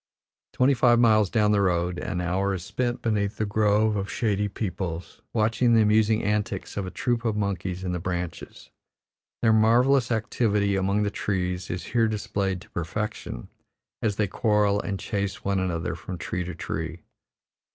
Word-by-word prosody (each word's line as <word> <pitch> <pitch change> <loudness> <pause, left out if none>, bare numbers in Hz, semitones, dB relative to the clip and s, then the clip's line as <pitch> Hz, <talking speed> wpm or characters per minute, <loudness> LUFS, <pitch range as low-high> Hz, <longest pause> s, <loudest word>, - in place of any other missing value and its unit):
Twenty 130 +2 +4
five 120 -2 +4
miles 110 -4 +4
down 105 -2 +2
the 105 -1 +3
road, 90 -2 +1
an 90 - -3
hour 95 +3 0
is 90 -1 -6
spent 120 -1 -2
beneath 105 -3 0
a 110 - +1
grove 105 +1 +2
of 100 -1 -3
shady 105 -3 0
peepuls, 90 -4 -5
watching 115 +2 +2
the 110 - +6
amusing 110 +1 +3
antics 105 -2 -2
of 100 -2 -3
a - - -3
troop 120 +4 -1
of 110 -3 0
monkeys 95 -3 -2
in 90 - -2
the 90 - -2
branches. 85 -1 -5 0.7
Their 110 -1 +5
marvellous 120 +4 +4
activity 105 -3 +1
among 100 +2 +1
the 100 - -1
trees 90 -3 -2
is 90 - -3
here 115 -2 +1
displayed 100 -3 -2
to - - -16
perfection, 85 - -4 0.5
as 105 -3 0
they 105 - +1
quarrel 105 0 +2
and 100 -1 -4
chase 100 -2 -3
one 100 -1 +1
another 85 -4 -2
from 90 +3 -7
tree 90 +1 -3
to 90 -1 -6
tree. 80 0 -5
100 Hz, 170 wpm, -26 LUFS, 90-110 Hz, 0.7 s, the